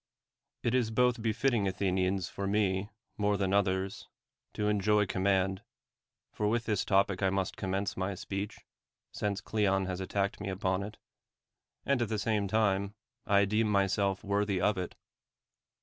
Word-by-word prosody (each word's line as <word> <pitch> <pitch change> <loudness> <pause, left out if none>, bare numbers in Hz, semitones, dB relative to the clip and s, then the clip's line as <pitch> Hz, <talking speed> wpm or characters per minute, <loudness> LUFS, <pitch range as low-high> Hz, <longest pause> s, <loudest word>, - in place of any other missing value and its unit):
It 120 - +1
is 125 -3 +2
both 125 +1 +2
befitting, 115 -1 +1
Athenians, 95 -1 0
for 100 +3 -4
me, 100 -1 +1 0.3
more 105 0 +2
than 95 -1 0
others, 95 -1 0 0.5
to 105 - 0
enjoy 105 0 +3
command 95 0 +1 0.7
(for 105 - -1
with 115 +2 +1
this 105 -4 0
topic 100 -1 +2
must 95 -1 -1
I - - -15
commence 95 +1 -1
my 95 +1 -2
speech, 100 +3 -5 0.5
since 100 -1 -2
Cleon 95 -3 +1
has 95 -1 -3
attacked 100 +1 -1
me 100 - -3
upon 95 0 -1
it), 105 +2 -7 0.9
and 140 -3 +2
at 120 - 0
the 110 - -1
same 105 -1 0
time, 100 -1 +1 0.3
I 100 0 +5
deem 105 +3 +1
myself 100 -1 +1
worthy 100 -1 0
of 105 +4 +2
it. 90 -2 -4
100 Hz, 150 wpm, -31 LUFS, 95-105 Hz, 0.9 s, I